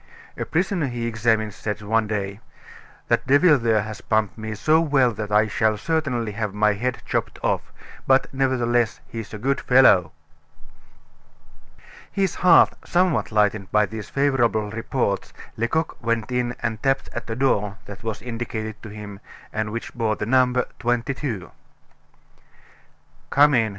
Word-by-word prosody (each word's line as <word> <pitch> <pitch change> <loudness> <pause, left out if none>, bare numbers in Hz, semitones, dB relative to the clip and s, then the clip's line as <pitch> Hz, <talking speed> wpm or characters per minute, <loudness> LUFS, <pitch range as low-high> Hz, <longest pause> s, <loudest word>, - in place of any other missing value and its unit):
A - - -4
prisoner 175 -2 0
he 120 -2 -4
had - - 0
examined 110 -2 +1
said 105 +1 -4
one 110 +1 +1
day: 100 -1 -3 0.7
'That - - +1
devil 145 +2 +5
there 110 -3 +2
has 110 -1 -7
pumped 110 -2 0
me 110 -1 -5
so 155 +9 +3
well 140 -6 +3
that 105 -1 -6
I 105 +1 +4
shall 110 +1 +1
certainly 130 -5 -1
have 105 -1 -4
my 105 0 +3
head 125 +5 -3
chopped - - -2
off; - - -1 0.4
but, 135 0 +4
nevertheless, 120 -3 +1
he's 115 -5 -7
a 105 - -6
good 135 +6 -1
fellow!" 105 -10 +5 2.0
His 195 -3 0
heart 180 - +6
somewhat 180 -6 +1
lightened 105 -2 +1
by 105 0 +4
these 110 +1 -8
favorable 120 -7 +1
reports, 115 -2 -2 0.2
Lecoq 160 +8 -1
went 115 0 -1
and 120 -3 -2
tapped 135 0 0
at 120 -1 -6
a 115 - -2
door 105 -6 0
that 100 +1 -10
was 110 -1 -4
indicated 115 -2 -5
to 110 - -9
him, 105 -1 -9 0.3
and 110 0 -2
which 115 +1 -5
bore 110 -3 0
the 105 - -4
number 125 +1 +3
22. 120 -3 -2 1.8
"Come 145 +1 +5
in!" 115 -3 +3
115 Hz, 150 wpm, -23 LUFS, 105-130 Hz, 2.0 s, heart